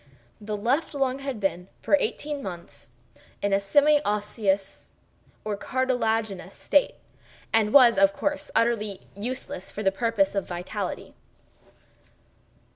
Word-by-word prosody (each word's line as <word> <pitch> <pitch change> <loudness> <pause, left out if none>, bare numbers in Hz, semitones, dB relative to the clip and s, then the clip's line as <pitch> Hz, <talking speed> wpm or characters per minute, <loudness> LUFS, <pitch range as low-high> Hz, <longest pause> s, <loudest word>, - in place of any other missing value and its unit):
The 210 0 -4
left 265 +9 0
lung 270 -1 0
had 275 -4 -4
been 190 -2 -2
for - - -3
eighteen 290 0 -3
months 170 - -8 0.5
in 200 -1 0
a 195 - +4
semi 290 +9 +4
osseous 205 -2 -1 0.6
or 210 -1 -1
cartilaginous 225 -6 -1
state, 290 - +2 0.6
and 220 -1 +3
was, 245 -5 +7
of 195 0 +6
course, 290 +8 -3
entirely 215 -4 +1
useless 215 -3 -5
for 210 - -5
all 195 - +4
purposes 210 -1 +1
of 195 -2 -2
vitality. 175 0 -5
215 Hz, 120 wpm, -26 LUFS, 195-260 Hz, 0.6 s, was